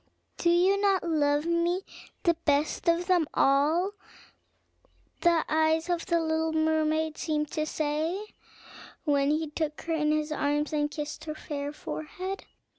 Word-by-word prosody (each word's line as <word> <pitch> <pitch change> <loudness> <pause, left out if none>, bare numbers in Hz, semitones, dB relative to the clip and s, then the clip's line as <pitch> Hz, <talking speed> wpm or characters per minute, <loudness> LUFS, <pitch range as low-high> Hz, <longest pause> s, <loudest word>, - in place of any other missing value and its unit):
"Do 340 - +2
you 370 +4 +4
not 390 -2 +3
love 295 -2 +2
me 340 +2 +1 0.4
the 340 - +4
best 305 0 0
of 340 +1 +2
them 355 -4 +3
all?" 305 +8 +3 1.3
the 340 -2 +3
eyes 315 +2 +2
of 345 -1 -2
the 340 -3 +2
little 320 0 0
mermaid 315 0 +1
seemed 300 -2 -1
to 310 0 -1
say, 310 +4 -1 0.8
when 285 -2 +2
he 305 0 0
took 305 -1 -3
her 330 - -2
in 300 -1 +1
his 305 0 0
arms, 295 +1 0
and 295 -1 +1
kissed 295 0 -6
her 305 -1 -4
fair 285 -2 -5
forehead. 365 +6 -6
315 Hz, 145 wpm, -28 LUFS, 300-340 Hz, 1.3 s, you